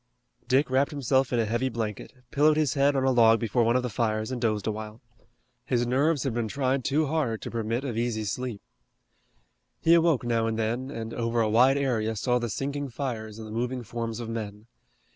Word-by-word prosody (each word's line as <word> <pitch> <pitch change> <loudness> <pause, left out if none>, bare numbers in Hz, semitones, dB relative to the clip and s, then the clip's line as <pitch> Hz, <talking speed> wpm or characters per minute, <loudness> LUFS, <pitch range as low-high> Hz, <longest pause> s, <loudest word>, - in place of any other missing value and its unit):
Dick 130 +1 +2
wrapped 135 +2 +3
himself 135 -3 +1
in 120 - +1
a 115 - +2
heavy 120 +4 0
blanket, 110 -3 -4 0.2
pillowed 150 +2 +4
his 150 -5 +2
head 140 0 +3
on 135 - +1
a 135 - +3
log 115 -2 +5
before 115 +1 +1
one 115 +2 +2
of 125 - +2
the - - -1
fires 110 +1 -1
and 125 -2 -4
dozed 110 -4 0
a 110 - +1
while. 110 +1 -7 0.6
His 120 -1 0
nerves 140 +4 +1
had 135 -4 -1
been 115 -1 -1
tried 130 +2 0
too 155 +5 +1
hard 140 -7 -1
to - - -5
permit 115 +2 -2
of 130 -5 -3
easy 115 -1 -1
sleep. 115 +1 -4 1.2
He 165 - +4
awoke 165 -6 +4
now 115 -1 +1
and 110 -1 -2
then 120 +4 -2
and 115 -4 -6
over 115 0 -1
a 110 -2 +2
wide 130 +5 +5
area 115 -5 0
saw 125 +3 +1
the 120 -1 -3
sinking 140 +5 -3
fires 115 -4 -5
and 110 -1 -8
the - - -9
moving 125 +2 -2
forms 115 0 -4
of 120 - -5
men. 105 -2 -6
120 Hz, 215 wpm, -27 LUFS, 110-135 Hz, 1.2 s, log